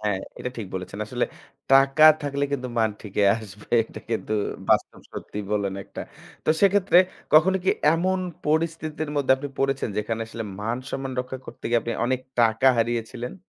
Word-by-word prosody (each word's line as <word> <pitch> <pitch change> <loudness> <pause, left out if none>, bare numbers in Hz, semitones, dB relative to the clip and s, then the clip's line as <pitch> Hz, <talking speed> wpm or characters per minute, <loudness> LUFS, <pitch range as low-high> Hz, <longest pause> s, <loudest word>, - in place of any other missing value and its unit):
হ্যা, 105 - +2 0.3
এটা 125 - -4
ঠিক 110 -4 -5
বলেছেন। 95 +2 -6
আসলে 120 +3 -1 0.5
টাকা 135 +3 +6 0.2
থাকলে 140 0 -1
কিন্তু 130 -2 -2
মান 110 -1 +3
ঠিকই 100 -1 +1
আসবে। 105 0 -6
এটা - - -11
কিন্তু 110 -1 -2 0.4
বাস্তব - - +2
সত্যি - - -7
বলেন 100 -2 0
একটা। - - -9 0.4
তো - - +3
সেক্ষেত্রে 200 -2 +5 0.3
কখনো 180 +5 +6
কি - - +4 0.2
এমন 185 +3 +1 0.3
পরিস্থিতির 155 -1 -1
মধ্যে 135 -2 +3
আপনি 145 +2 -6
পড়েছেন 135 -1 0
যেখানে 110 +2 -2
আসলে 115 0 -6 0.2
মান-সম্মান 130 +4 -4
রক্ষা 130 +1 -6
করতে - - -12
গিয়ে 120 0 +3
আপনি 115 - -3
অনেক 130 0 0 0.2
টাকা 115 +2 +3
হারিয়েছিলেন? 120 +1 -2
130 Hz, 160 wpm, -24 LUFS, 115-145 Hz, 0.5 s, টাকা